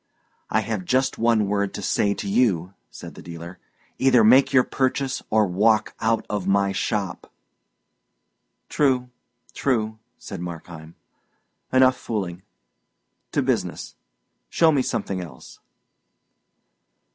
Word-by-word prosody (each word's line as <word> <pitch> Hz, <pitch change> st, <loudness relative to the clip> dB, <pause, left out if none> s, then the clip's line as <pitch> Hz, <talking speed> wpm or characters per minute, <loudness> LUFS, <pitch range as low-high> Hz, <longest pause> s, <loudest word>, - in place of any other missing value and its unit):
"I -, -, +2 dB
have 110 Hz, -5 st, -3 dB
just 130 Hz, +6 st, 0 dB
one 115 Hz, -2 st, +3 dB
word 100 Hz, 0 st, -1 dB
to -, -, -6 dB
say 100 Hz, -1 st, +1 dB
to 100 Hz, -, -5 dB
you," 100 Hz, -5 st, +1 dB, 0.2 s
said -, -, -10 dB
the -, -, -12 dB
dealer. 85 Hz, +1 st, -9 dB, 0.4 s
"Either 130 Hz, -3 st, +5 dB
make 130 Hz, +5 st, +6 dB
your 130 Hz, -2 st, +5 dB
purchase, 130 Hz, +1 st, -1 dB
or 110 Hz, -1 st, +3 dB
walk 105 Hz, +4 st, +2 dB
out 115 Hz, 0 st, 0 dB
of 100 Hz, -3 st, -3 dB
my 100 Hz, 0 st, +2 dB
shop." 95 Hz, -1 st, -3 dB, 1.4 s
"True, 130 Hz, -4 st, +1 dB, 0.4 s
true," 110 Hz, -5 st, -1 dB, 0.2 s
said 95 Hz, -4 st, -8 dB
Markheim. 85 Hz, -2 st, -8 dB, 0.8 s
"Enough 130 Hz, 0 st, +4 dB
fooling. 95 Hz, -6 st, -4 dB, 0.9 s
To -, -, +1 dB
business. -, -, -2 dB, 0.6 s
Show 165 Hz, -1 st, +4 dB
me 140 Hz, -3 st, +2 dB
something 95 Hz, -6 st, -2 dB
else." 80 Hz, -8 st, -12 dB
105 Hz, 120 wpm, -23 LUFS, 95-125 Hz, 1.4 s, make